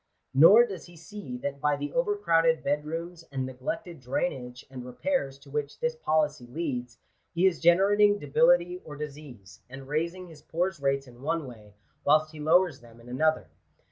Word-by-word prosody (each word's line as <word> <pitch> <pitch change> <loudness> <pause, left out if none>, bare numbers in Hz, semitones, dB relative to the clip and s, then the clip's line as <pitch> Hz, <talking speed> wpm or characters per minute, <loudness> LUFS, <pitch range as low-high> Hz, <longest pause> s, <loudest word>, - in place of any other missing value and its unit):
Nor 195 - +8
does 195 -7 -8
he 175 -1 -15
see 165 -6 -8
that 140 -1 -4
by 150 -1 +2
the 145 +1 -5
overcrowded 165 - +2
bed 145 +1 0
rooms 165 +2 -6
and 135 -2 -2
neglected 165 +7 -5
drainage 125 -1 -3
and 130 -2 -9
repairs 135 - -2
to 140 0 -17
which 145 -1 -3
this 485 0 -1
policy 150 - 0
leads, 125 -4 -4 0.4
he 175 +3 +3
is 185 -4 +3
generating 205 +4 +5
debility 460 - +3
or 145 - -9
disease, 140 -9 -9
and 135 +1 -10
raising 170 +5 -2
his 160 -4 -14
poors 175 +2 -2
rates 140 0 0
in 125 -1 -16
one 160 +2 -1
way, 105 -5 -13 0.3
whilst 155 +1 +3
he 155 - -11
lowers 160 0 +3
them 120 -1 -17
in 120 +1 -14
another. 155 +5 +1
155 Hz, 175 wpm, -28 LUFS, 135-175 Hz, 0.4 s, Nor